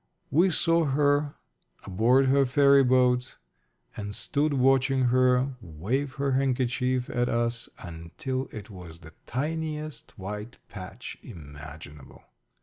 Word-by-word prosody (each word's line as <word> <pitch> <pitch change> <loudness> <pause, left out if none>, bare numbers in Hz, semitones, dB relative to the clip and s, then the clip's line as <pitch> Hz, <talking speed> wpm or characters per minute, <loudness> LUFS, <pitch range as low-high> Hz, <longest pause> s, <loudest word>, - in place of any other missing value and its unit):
We 170 +7 +4
saw 165 0 +2
her 145 +1 +1 0.5
aboard 115 +8 +3
her 135 +1 +4
ferryboat, 130 -2 +4 0.6
and 105 -1 -5
stood 150 +1 0
watching 135 -1 +3
her 130 +1 +3
wave 110 - -3
her 140 -1 -1
handkerchief 130 -1 0
at 120 0 0
us 115 0 -1
until 90 +11 -5
it 105 0 -9
was 90 -3 -11
the 80 0 -13
tiniest 155 +2 -4
white 105 +4 -7
patch 95 +3 -9
imaginable. 75 - -11
125 Hz, 110 wpm, -27 LUFS, 105-140 Hz, 0.6 s, We